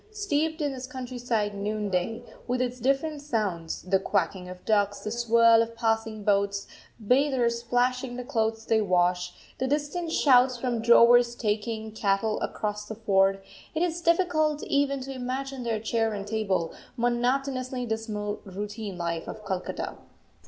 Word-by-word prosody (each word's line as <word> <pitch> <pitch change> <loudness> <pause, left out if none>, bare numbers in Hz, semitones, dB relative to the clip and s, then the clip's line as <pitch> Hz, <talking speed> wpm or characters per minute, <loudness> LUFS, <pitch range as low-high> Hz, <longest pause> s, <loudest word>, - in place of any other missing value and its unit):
Steeped 320 -6 -1
in 290 -1 0
this 260 -1 -6
countryside 245 -5 -2
noonday, 210 +1 -2 0.2
with 250 0 0
its 250 0 -2
different 275 +4 0
sounds 205 - -2
the 190 +1 +2
quacking 185 -1 -1
of 180 0 -10
ducks, 205 -2 +1
the 215 - -4
swirl 230 -1 +5
of 230 0 -3
passing 225 -2 -1
boats, 200 0 +1 0.3
bathers 245 0 +2
splashing 245 +1 0
the 250 - -5
clothes 225 -3 -1
they 220 -1 +3
wash, 180 -2 +1 0.3
the 260 - 0
distant 300 +4 -1
shouts 255 -4 +5
from 240 -2 -1
drovers 235 +1 +6
taking 220 0 -2
cattle 210 0 0
across 210 0 -3
the 220 - -6
ford, 195 -3 +2 0.3
it 320 - +1
is 345 -1 -1
difficult 330 -3 +2
even 280 -1 +1
to 270 +1 -6
imagine 260 +1 -4
the 230 -2 -1
chair 225 0 0
and 200 -1 -5
table, 200 -6 -1 0.2
monotonously 255 +1 0
dismal 215 -2 -3
routine 205 0 -6
life 170 -1 -3
of 215 -1 -8
Calcutta. 185 -2 -4
230 Hz, 145 wpm, -27 LUFS, 210-255 Hz, 0.3 s, drovers